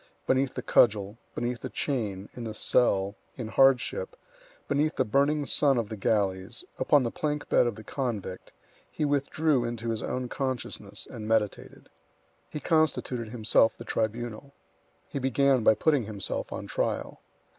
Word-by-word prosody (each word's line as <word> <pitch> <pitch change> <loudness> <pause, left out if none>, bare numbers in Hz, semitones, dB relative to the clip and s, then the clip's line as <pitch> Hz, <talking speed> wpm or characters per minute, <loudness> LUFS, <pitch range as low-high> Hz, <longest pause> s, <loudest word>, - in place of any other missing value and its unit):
Beneath 130 0 +1
the - - -4
cudgel, 105 -1 +3 0.2
beneath 120 0 -2
the - - -6
chain, 105 -8 -2
in 120 - -7
the 110 -2 -5
cell, 100 -5 +2 0.2
in 115 -4 -5
hardship, 135 - +3 0.5
beneath 150 +2 +1
the 130 - +1
burning 140 +5 +2
sun 140 -1 +3
of 115 -3 -1
the 110 - -4
galleys, 100 +1 -1
upon 135 +1 +4
the 115 - -1
plank 150 -1 -2
bed 120 - +4
of 120 - -2
the 110 - -10
convict, 110 -7 -4 0.4
he 150 - -2
withdrew 145 -1 +1
into 115 -1 -3
his 110 - -3
own 125 0 -3
consciousness 130 -2 -4
and 110 -2 -7
meditated. 110 -3 -1 0.6
He 150 - -5
constituted 145 -8 +1
himself 115 -1 +3
the 115 - -9
tribunal. 120 +5 -3 0.5
He 140 - -4
began 135 -1 +3
by 110 - +6
putting 140 +1 +2
himself 100 -2 -4
on - - -5
trial. - - -2
120 Hz, 155 wpm, -28 LUFS, 110-140 Hz, 0.6 s, by